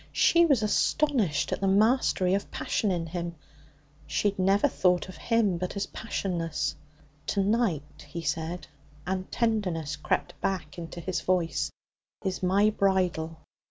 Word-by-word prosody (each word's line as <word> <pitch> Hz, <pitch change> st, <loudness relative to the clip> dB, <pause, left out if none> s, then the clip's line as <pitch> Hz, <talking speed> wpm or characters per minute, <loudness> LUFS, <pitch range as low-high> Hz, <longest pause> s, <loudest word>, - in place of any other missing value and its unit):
She 340 Hz, 0 st, +5 dB
was 265 Hz, -8 st, +3 dB
astonished 215 Hz, -, +1 dB
at -, -, -3 dB
the 195 Hz, -, +2 dB
mastery 200 Hz, -2 st, +3 dB
of 200 Hz, -, -1 dB
passion 210 Hz, -, -1 dB
in 175 Hz, -3 st, -1 dB
him. 170 Hz, 0 st, -4 dB, 0.7 s
She 205 Hz, -, +1 dB
had 195 Hz, -, -15 dB
never 195 Hz, +6 st, +4 dB
thought 180 Hz, -9 st, +2 dB
of 185 Hz, -, -9 dB
him 220 Hz, -7 st, +1 dB
but 180 Hz, +2 st, -3 dB
as 200 Hz, -, 0 dB
passionless. 175 Hz, -8 st, -2 dB, 0.5 s
'To 200 Hz, -, +1 dB
night,' 160 Hz, -, -1 dB
he 170 Hz, +2 st, -5 dB
said, 160 Hz, +4 st, -2 dB, 0.4 s
and 185 Hz, 0 st, -3 dB
tenderness 190 Hz, -10 st, 0 dB
crept 150 Hz, -, -1 dB
back 175 Hz, -4 st, -2 dB
into 170 Hz, +1 st, -7 dB
his 185 Hz, +1 st, -2 dB
voice, 180 Hz, -3 st, 0 dB, 0.6 s
'is 190 Hz, -1 st, -1 dB
my 200 Hz, +3 st, +3 dB
bridal. 180 Hz, -5 st, 0 dB
185 Hz, 145 wpm, -28 LUFS, 170-205 Hz, 0.7 s, She